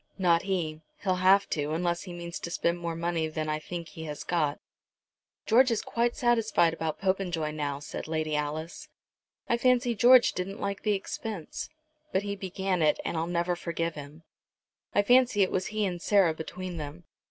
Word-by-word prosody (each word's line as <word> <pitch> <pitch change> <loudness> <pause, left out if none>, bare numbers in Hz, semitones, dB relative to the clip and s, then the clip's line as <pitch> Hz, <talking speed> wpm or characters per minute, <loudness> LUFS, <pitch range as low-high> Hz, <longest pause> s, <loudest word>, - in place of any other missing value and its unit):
"Not 170 -3 +3
he. 170 -5 -2 0.2
He'll 185 -2 +1
have 195 +2 +5
to, 150 0 -1
unless 170 +1 0
he 180 - -7
means 170 0 -6
to - - -5
spend 170 0 0
more 170 -1 -3
money 165 -1 -1
than 155 0 -3
I 155 0 -1
think 170 +1 -6
he 160 - -8
has 150 -1 -6
got." 155 -4 0 0.9
"George 255 +4 +5
is 230 -3 0
quite 235 +1 0
satisfied 225 -8 +3
about 160 -1 -3
Popenjoy 185 -5 0
now," 145 -2 -2
said 145 +2 -7
Lady 155 -1 -1
Alice. 155 +3 -4 0.6
"I 235 - +2
fancy 250 -1 +3
George 245 +2 +6
didn't 195 +2 -4
like 200 0 -3
the 210 - +1
expense. 195 -2 -5 0.4
But 190 - +1
he 200 0 -3
began 190 -1 -2
it, 150 -1 +3
and - - -2
I'll 165 +1 -1
never 175 0 0
forgive 170 -1 -2
him. 150 +2 -10 0.7
I 205 - +5
fancy 245 -2 +5
it 185 - 0
was 185 - -1
he 215 -1 -1
and 175 -3 -3
Sarah 195 -5 +4
between 175 +3 -6
them. 150 +3 -7
175 Hz, 185 wpm, -28 LUFS, 160-200 Hz, 0.9 s, George